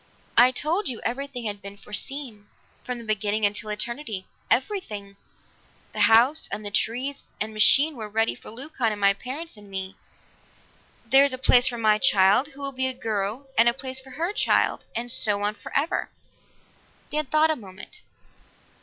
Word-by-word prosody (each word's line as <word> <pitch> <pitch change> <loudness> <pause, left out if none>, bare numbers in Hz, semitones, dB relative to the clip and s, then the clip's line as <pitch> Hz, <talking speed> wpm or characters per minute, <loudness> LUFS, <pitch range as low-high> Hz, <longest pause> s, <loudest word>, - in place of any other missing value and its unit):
"I 245 +2 +7
told 305 +7 -1
you 240 - -5
everything 250 0 -4
had 205 -1 -3
been 200 +1 -8
foreseen, 210 +1 -3 0.4
from 250 -1 -4
the 235 - -9
beginning 215 -1 0
until 210 +1 -2
eternity 215 -1 -4 0.2
everything. 215 - -1 0.8
The - - -6
house 245 +7 +4
and 215 - -5
trees 260 +6 -2
and 215 +1 -3
machine 280 +8 +5
were 220 -3 -7
ready 225 +2 +1
for - - -12
Leucon 250 -1 -3
and 210 - -5
my 200 0 +4
parents 265 +7 -7
and 205 -1 -15
me. 190 0 -5 1.1
There 270 +4 +6
is 280 -2 +1
a - - -3
place 250 -1 +5
for 240 - -1
my 215 -2 +3
child, 205 +1 +4
who 285 -1 -14
will 275 0 -2
be 260 0 0
a 260 - -2
girl, 220 +3 -2
and 235 +1 +7
a 235 - -1
place 260 -1 -4
for 265 0 -15
her 330 +9 -3
child - - +1
and 240 +1 -1
so 205 -2 +1
on 205 +1 0
forever." 285 - -2 1.0
Dan 300 -1 -1
thought 310 +3 +3
a - - 0
moment. 190 -6 -11
235 Hz, 170 wpm, -25 LUFS, 210-275 Hz, 1.1 s, I